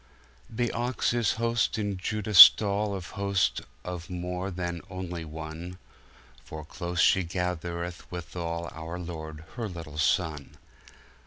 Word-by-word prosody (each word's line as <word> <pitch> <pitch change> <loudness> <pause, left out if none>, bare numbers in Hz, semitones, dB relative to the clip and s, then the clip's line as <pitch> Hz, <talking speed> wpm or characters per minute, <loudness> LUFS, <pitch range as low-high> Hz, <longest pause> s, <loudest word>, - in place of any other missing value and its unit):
The 120 +1 -1
Ox 120 +1 -1
is 120 -3 +2
host 115 -2 0
in 105 -2 -2
Judah 105 +3 -3
stallAnd 100 0 +7
Host 100 -1 0 0.2
of 90 -1 -6
more 90 +1 -4
than 90 -2 -4
onelie 90 -3 -5
one, 80 +3 -7 0.7
For 80 -1 -8
close 85 +2 -5
she 95 - +5
gathereth 85 0 -4
withalOur 85 -1 -5
Lorde 80 -2 -7
her 115 -3 -3
littel 80 -4 -8
Sonne. 75 -3 0
90 Hz, 115 wpm, -28 LUFS, 85-100 Hz, 0.7 s, stallAnd